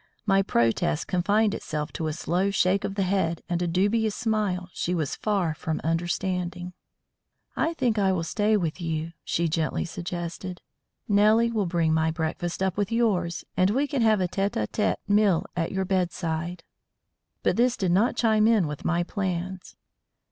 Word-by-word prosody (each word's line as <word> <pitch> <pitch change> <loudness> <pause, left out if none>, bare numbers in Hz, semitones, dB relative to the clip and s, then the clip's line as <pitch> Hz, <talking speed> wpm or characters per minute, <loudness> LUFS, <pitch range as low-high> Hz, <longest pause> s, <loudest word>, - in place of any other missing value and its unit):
My 195 -2 +4
protest 150 +2 +1
confined 205 +4 +2
itself 150 -5 -4
to 160 - -3
a 155 - -1
slow 175 +4 0
shake 190 0 +2
of 195 - -3
the 200 - +1
head 180 -3 0
and 175 0 -1
a 175 - 0
dubious 205 +5 +1
smile 210 -6 -1
she 180 - -1
was 155 -5 -1
far 195 -7 0
from 155 0 -3
understanding. 175 +2 -2 0.8
"I 330 +1 0
think 240 -7 +1
I 195 -1 +3
will 180 -3 0
stay 210 +6 +1
with 170 -2 -3
you," 160 -1 -2
she 170 0 0
gently 160 0 -1
suggested. 175 +1 -5 0.5
"Nellie 215 +3 +4
will 210 -5 0
bring 165 -2 +1
my 160 0 +2
breakfast 165 +2 -2
up 190 -1 -1
with 205 +1 -1
yours, 190 -7 0
and 185 +1 +3
we 265 +7 +2
can 280 -3 -1
have 220 -2 +4
a 185 - +1
tête 195 +3 -1
à 105 - +1
tête 210 - 0
meal 205 -4 +3
at 165 -2 -1
your 190 0 -1
bedside." 175 -2 -2 0.8
But - - +2
this 245 +1 +2
did 190 -5 0
not 210 +8 +3
chime 220 -2 +3
in 220 -6 +4
with 150 -1 -5
my 175 0 +1
plans. 185 -1 -4
185 Hz, 175 wpm, -26 LUFS, 170-205 Hz, 0.8 s, My